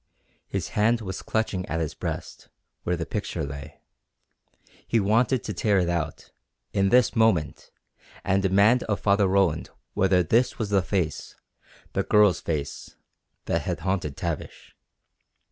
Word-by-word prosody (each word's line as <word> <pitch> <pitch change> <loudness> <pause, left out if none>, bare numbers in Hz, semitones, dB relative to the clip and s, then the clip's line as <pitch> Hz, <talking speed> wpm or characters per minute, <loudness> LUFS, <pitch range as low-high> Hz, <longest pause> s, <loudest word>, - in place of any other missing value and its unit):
His - - -3
hand 115 +3 +2
was 95 -2 -5
clutching 110 -4 -1
at 80 - -2
his 80 -2 -2
breast, - - -6 0.3
where 90 0 -1
the 80 - -3
picture 100 -5 -3
lay. 70 +1 -9 1.1
He 115 - +2
wanted 115 +4 +2
to 105 - -4
tear 100 +3 +2
it 90 -2 +1
out, 85 -3 -3 0.4
in 95 0 +2
this 125 +1 +4
moment, 110 - +1 0.5
and 95 +1 +2
demand 100 +6 +4
of 100 -2 -1
Father 100 -1 +3
Roland 95 -4 +1 0.2
whether 95 -2 +3
this 120 +9 +2
was 105 -3 -3
the 100 -1 +4
face 90 -5 -2 0.6
the - - +1
girl's 105 -7 +4
face 75 -3 -4 0.5
that - - 0
had - - -3
haunted 90 -6 -2
Tavish. 85 -3 -5
95 Hz, 145 wpm, -25 LUFS, 85-105 Hz, 1.1 s, this